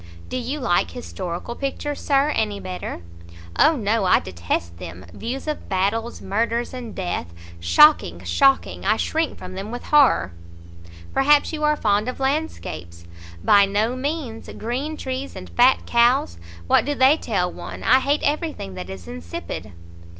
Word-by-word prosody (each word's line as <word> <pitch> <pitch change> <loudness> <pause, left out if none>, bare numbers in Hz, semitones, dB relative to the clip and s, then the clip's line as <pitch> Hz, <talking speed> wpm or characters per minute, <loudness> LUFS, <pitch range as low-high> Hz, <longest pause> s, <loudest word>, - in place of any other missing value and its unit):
"Do 255 - -3
you 255 +4 -3
like 175 - +1
historical 170 - -6
pictures, 280 +2 -3
Sir, 280 0 +2
any 210 -6 -1
better?" 180 - -6 0.6
"O 315 +1 +6
no, 220 -4 0
I 180 - +5
detest 85 -1 -4
them! 90 +1 -9
views 255 +6 -5
of 305 - -4
battles, 205 +5 -1
murders, 230 +5 -1
and 245 -4 -7
death! 175 - -3 0.3
Shocking! 300 - +5
shocking! 275 -1 +2
I - - +2
shrink 320 0 -1
from 185 0 -9
them 195 +3 -6
with 245 +1 -6
horror!" 280 - +4 0.8
"Perhaps 290 +3 +4
you 305 -1 -3
are 300 0 +3
fond 210 +1 +1
of 255 - -6
landscapes?" 265 - -3 0.4
"By 200 -1 +6
no 215 +5 0
means! 270 -4 -4
Green 270 +7 -3
trees 260 +1 -5
and - - -9
fat 250 +2 +4
cows! 235 - +2 0.3
what - - +4
do 290 +1 -2
they 265 +2 +6
tell 185 - -1
one? - - -8
I 260 - +5
hate 285 +3 0
every 305 +2 0
thing 95 - -8
that 90 0 -7
is 95 -3 -9
insipid." 85 +3 -7
235 Hz, 155 wpm, -22 LUFS, 180-275 Hz, 0.8 s, O